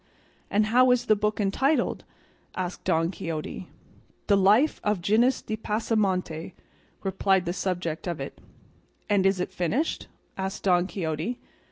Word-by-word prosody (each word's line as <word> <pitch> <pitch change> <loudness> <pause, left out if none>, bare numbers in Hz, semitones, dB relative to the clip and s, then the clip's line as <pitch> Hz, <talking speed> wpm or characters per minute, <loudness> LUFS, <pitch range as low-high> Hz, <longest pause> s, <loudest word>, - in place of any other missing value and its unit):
"And 210 +1 +2
how 255 +1 +6
is 250 -1 +3
the 215 - +4
book 210 +1 -1
entitled?" 265 +9 +1 0.5
asked 180 -1 -4
Don 165 -1 +2
Quixote. 165 0 -5 0.6
"The 205 - +4
'Life 210 +10 +4
of 210 -2 +1
Gines 230 +8 +2
de 215 - -3
Pasamonte,'" 200 -6 -1 0.5
replied 190 -1 +1
the 175 - -1
subject 180 -3 -3
of 170 -4 -3
it. 135 - -7 0.7
"And 200 -2 +3
is 195 -1 +1
it 180 - -2
finished?" 220 - -1 0.3
asked 190 +1 -3
Don 180 -2 +3
Quixote. 170 +5 -3
195 Hz, 140 wpm, -26 LUFS, 175-215 Hz, 0.7 s, how